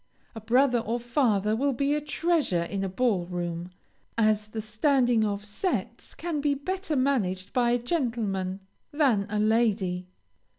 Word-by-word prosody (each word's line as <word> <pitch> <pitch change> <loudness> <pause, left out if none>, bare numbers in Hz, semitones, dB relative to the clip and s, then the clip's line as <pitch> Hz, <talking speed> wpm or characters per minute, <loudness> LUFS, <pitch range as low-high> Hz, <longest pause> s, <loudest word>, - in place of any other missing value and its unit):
A 225 - -8
brother 245 +3 +3
or 230 +1 -2
father 230 -4 +1
will 275 +4 +1
be 280 +3 +1
a 300 - 0
treasure 300 - 0
in 195 +3 -3
a 195 - -1
ball 190 -3 0
room, 175 -1 -4 0.5
as 215 -2 +2
the 220 +1 -6
standing 240 +2 +2
of 205 -1 -2
sets 280 - -3
can 325 -4 -3
be 285 -1 +1
better 370 +3 -3
managed 200 -9 0
by 245 -1 +3
a 240 - +3
gentleman 225 - -2 0.3
than 260 -10 +2
a 210 - -2
lady. 210 -5 +1
230 Hz, 155 wpm, -27 LUFS, 200-275 Hz, 0.5 s, brother